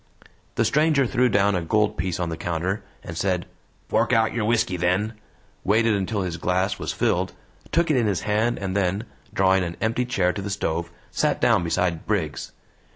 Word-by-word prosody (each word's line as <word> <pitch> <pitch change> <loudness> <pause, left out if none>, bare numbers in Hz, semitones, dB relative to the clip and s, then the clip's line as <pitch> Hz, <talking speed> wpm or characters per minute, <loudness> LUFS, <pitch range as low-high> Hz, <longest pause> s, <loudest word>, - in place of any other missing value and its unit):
The - - +2
stranger 150 -2 +3
threw 125 +1 +2
down 100 -1 +3
a 90 - 0
gold 105 +5 +1
piece 90 -2 -2
on 85 -2 -1
the 80 - -3
counter 90 +5 -2 0.2
and 85 - -7
said: 90 0 0 0.4
"Fork - - +1
out 110 -1 +3
your 115 -2 -1
whisky, 110 -4 +1
then," 90 +5 +1 0.5
waited 110 +2 +3
until 100 0 -1
his 85 -2 -3
glass 95 +3 0
was - - -2
filled, - - 0 0.4
took 170 -1 +2
it 145 - +3
in 115 -3 +2
his 100 -4 0
hand, 110 +3 +1
and 95 -1 -3
then, 100 +1 +1 0.3
drawing 95 0 +3
an 85 -1 -5
empty 115 +3 0
chair 90 -7 +1
to 100 - -4
the 100 - -4
stove, 85 -4 -2 0.2
sat - - +1
down - - +3
beside 85 0 -1
Briggs. - - -2
100 Hz, 190 wpm, -24 LUFS, 90-110 Hz, 0.5 s, stranger